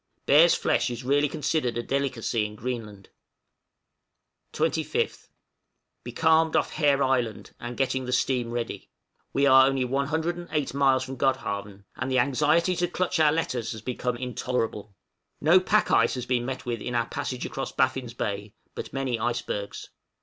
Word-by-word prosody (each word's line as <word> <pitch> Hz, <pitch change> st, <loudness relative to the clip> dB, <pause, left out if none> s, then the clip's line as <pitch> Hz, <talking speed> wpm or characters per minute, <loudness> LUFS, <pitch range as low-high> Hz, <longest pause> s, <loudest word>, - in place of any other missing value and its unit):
Bear's 160 Hz, +4 st, +6 dB
flesh -, -, +1 dB
is 120 Hz, +1 st, -6 dB
really 145 Hz, +3 st, +2 dB
considered 135 Hz, -5 st, -1 dB
a 120 Hz, -, -2 dB
delicacy 125 Hz, -5 st, -1 dB
in 105 Hz, 0 st, -5 dB
Greenland. 105 Hz, -4 st, -6 dB, 1.4 s
25th. -, -, -1 dB, 0.8 s
Becalmed 160 Hz, +6 st, +2 dB
off -, -, +1 dB
Hare 145 Hz, -3 st, +2 dB
Island, 125 Hz, -4 st, -1 dB
and 120 Hz, 0 st, -6 dB
getting 130 Hz, -1 st, 0 dB
the 125 Hz, -, -4 dB
steam 125 Hz, -1 st, +1 dB
ready. 120 Hz, 0 st, -4 dB, 0.4 s
We 140 Hz, -, +2 dB
are 130 Hz, -1 st, +7 dB
only 135 Hz, -1 st, 0 dB
108 155 Hz, +3 st, -2 dB
miles 135 Hz, -2 st, +3 dB
from 130 Hz, 0 st, -7 dB
Godhavn, 100 Hz, -7 st, -2 dB
and 130 Hz, -, -3 dB
the 130 Hz, -, +1 dB
anxiety 150 Hz, +7 st, +2 dB
to 175 Hz, 0 st, +1 dB
clutch 180 Hz, 0 st, -1 dB
our 155 Hz, -2 st, +5 dB
letters 130 Hz, -8 st, -2 dB
has 110 Hz, -1 st, -9 dB
become 125 Hz, 0 st, -2 dB
intolerable. 120 Hz, -4 st, -3 dB, 0.4 s
No 160 Hz, +5 st, +6 dB
pack 210 Hz, +3 st, +2 dB
ice 115 Hz, +3 st, +4 dB
has 125 Hz, -1 st, -4 dB
been 125 Hz, -1 st, 0 dB
met 130 Hz, -1 st, -5 dB
with 120 Hz, -3 st, -3 dB
in 125 Hz, -, -4 dB
our 115 Hz, -1 st, +2 dB
passage 125 Hz, +1 st, -4 dB
across 135 Hz, -, -4 dB
Baffin's 130 Hz, -2 st, 0 dB
Bay, 100 Hz, -1 st, -4 dB, 0.2 s
but -, -, -7 dB
many 130 Hz, -4 st, -2 dB
icebergs. 110 Hz, -3 st, -3 dB
130 Hz, 155 wpm, -26 LUFS, 120-140 Hz, 1.4 s, are